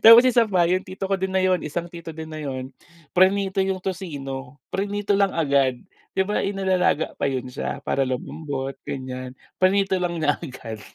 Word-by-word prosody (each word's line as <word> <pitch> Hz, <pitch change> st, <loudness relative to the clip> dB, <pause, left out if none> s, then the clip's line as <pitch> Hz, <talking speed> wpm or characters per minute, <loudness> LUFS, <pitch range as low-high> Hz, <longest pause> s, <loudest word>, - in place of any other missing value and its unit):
Tapos 230 Hz, +2 st, +11 dB
isa 240 Hz, -2 st, +5 dB
pa 180 Hz, -4 st, +3 dB
yung 185 Hz, +2 st, +1 dB
tito 190 Hz, +1 st, -5 dB
ko 195 Hz, -, +4 dB
din 190 Hz, 0 st, -2 dB
na 190 Hz, -, +3 dB
yun 185 Hz, -2 st, +3 dB
isang 170 Hz, +3 st, -3 dB
tito 165 Hz, -2 st, -8 dB
din 160 Hz, 0 st, -7 dB
na 155 Hz, 0 st, -6 dB
yun, 130 Hz, -3 st, -4 dB, 0.4 s
prinito 190 Hz, +1 st, +4 dB
yung 190 Hz, -1 st, -1 dB
tocino, 140 Hz, -8 st, -5 dB
prinito 205 Hz, +1 st, 0 dB
lang 200 Hz, -1 st, +4 dB
agad 140 Hz, -5 st, +3 dB, 0.4 s
'di 190 Hz, -, +3 dB
ba 210 Hz, -, 0 dB
inilalaga 190 Hz, -5 st, +1 dB
pa -, -, 0 dB
yun 130 Hz, -2 st, -2 dB
siya 125 Hz, -, -4 dB
para 135 Hz, -, +2 dB
lumambot 135 Hz, +1 st, -3 dB
ganyan, 130 Hz, -1 st, -5 dB, 0.3 s
prinito 195 Hz, +1 st, +4 dB
lang 175 Hz, -1 st, -1 dB
niya 145 Hz, -2 st, +2 dB
agad. 115 Hz, -7 st, -7 dB
170 Hz, 180 wpm, -24 LUFS, 135-190 Hz, 0.4 s, Tapos